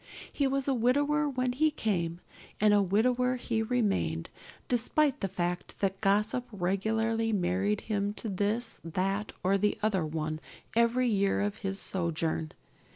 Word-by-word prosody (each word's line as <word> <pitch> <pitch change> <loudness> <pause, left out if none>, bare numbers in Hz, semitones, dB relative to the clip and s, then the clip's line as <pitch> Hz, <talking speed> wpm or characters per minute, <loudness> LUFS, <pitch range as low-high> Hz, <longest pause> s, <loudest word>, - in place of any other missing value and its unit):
He 280 - +1
was 275 0 -1
a 275 - +3
widower 290 +5 +2
when 255 -2 0
he 310 +5 +3
came, 175 - -2 0.4
and 210 0 +5
a 205 - +5
widower 250 +6 +2
he 235 -2 -1
remained, 200 - 0 0.4
despite 270 +4 +1
the 195 - 0
fact 175 -1 -3
that 195 -1 -1
gossip 210 +4 +1
regularly 220 +4 0
married 195 +2 +1
him 205 -1 -1
to 225 - -5
this, 210 +4 -1
that, 195 +5 -1
or 195 +2 +3
the 210 +1 +1
other 200 -5 +2
one, 155 0 -3 0.4
every 235 +2 +3
year 200 -3 +2
of 205 0 -1
his 195 0 -2
sojourn. 165 -3 -1
210 Hz, 150 wpm, -30 LUFS, 190-245 Hz, 0.4 s, and